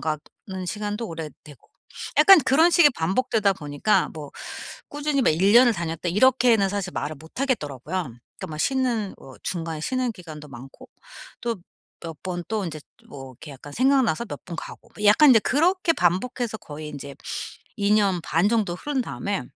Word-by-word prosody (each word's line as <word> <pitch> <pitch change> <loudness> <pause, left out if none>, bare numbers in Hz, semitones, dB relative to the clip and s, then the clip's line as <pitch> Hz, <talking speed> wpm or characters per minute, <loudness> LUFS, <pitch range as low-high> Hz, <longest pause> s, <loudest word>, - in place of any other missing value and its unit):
가는 155 -1 -2 0.5
시간도 210 +3 -3
오래되고. 155 -3 -10 0.5
약간 390 -3 +9
그런 320 +6 +5
식이 335 -4 +6
반복되다 200 +3 +1
보니까 150 +4 0
뭐 150 -3 -8 0.6
"꾸준히 290 -1 -1
막 - - +4
1 190 +7 +3
년을 240 -1 +7
다녔다." 165 -1 -4
이렇게는 235 -1 +4
사실 195 -2 -3
말을 150 +1 -3
못 160 - -9
하겠더라고요. 150 - -2
그러니까 120 -1 -11
막 155 -1 -7
쉬는 240 - 0
뭐 130 - -13
중간에 165 -3 -3
쉬는 255 +3 -1
기간도 155 -6 -11
많고 130 +1 -12 0.5
또 235 -1 -1 0.5
몇 165 -3 -8
번 175 -2 -4
또 220 -2 -2
인제 155 -2 -6 0.3
뭐 135 -2 -9
이렇게 145 +4 -12
약간 140 +2 -11
생각나서 255 - +2
몇 - - -8
번 170 - -6
가고. - - -9
뭐 210 - -7
약간 260 +7 +7
이제 225 - +7
그렇게 340 - +2
반복해서 220 - 0
거의 150 -4 -8
인제 140 -2 -8 0.6
2 200 +1 +1
년 195 -4 +2
반 170 +6 +2
정도 215 -6 +1
흐른 280 +8 -2
다음에 200 - -3
195 Hz, 340 characters per minute, -24 LUFS, 155-245 Hz, 0.6 s, 약간